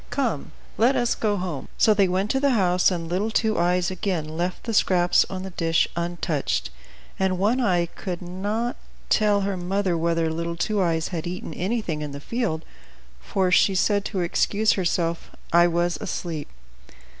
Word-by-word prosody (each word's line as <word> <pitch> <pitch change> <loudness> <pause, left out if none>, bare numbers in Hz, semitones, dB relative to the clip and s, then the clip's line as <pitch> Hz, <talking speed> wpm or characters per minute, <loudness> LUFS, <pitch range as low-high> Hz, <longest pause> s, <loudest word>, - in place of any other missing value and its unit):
Come, 240 - -2 0.3
let 245 +5 +4
us 240 -1 +2
go 210 -2 0
home!" 180 -7 -4
So 215 - +5
they 200 -2 +3
went 190 +3 0
to 265 - +1
the 280 -1 +2
house, 180 -2 +3
and 170 -3 -3
little 190 +6 -1
Two 220 -2 +1
Eyes 180 +1 +2
again 185 -4 -2
left 175 +2 -2
the 230 - -3
scraps 180 -4 +3
on 190 -1 -5
the 190 - -6
dish 165 -2 +1
untouched, 170 -3 -2 0.5
and 190 -1 +1
One 220 +7 +2
Eye 180 -6 +2
could 175 +1 -6
not 205 +7 -3 0.3
tell 210 -2 +3
her 195 0 -1
mother 185 0 -1
whether 165 0 +1
little 170 +1 -3
Two 200 +4 0
Eyes 165 -2 0
had 170 -2 -4
eaten 175 -2 -5
anything 180 -4 -2
in 150 -2 -5
the 140 - -6
field; 185 - -2 0.6
for 185 - 0
she 190 +1 +4
said 200 +2 +2
to 190 -4 -2
excuse 205 +5 +2
herself, 170 -2 -1 0.2
"I 175 0 +6
was 175 +1 0
asleep." 170 -6 -4
180 Hz, 175 wpm, -24 LUFS, 170-205 Hz, 0.6 s, I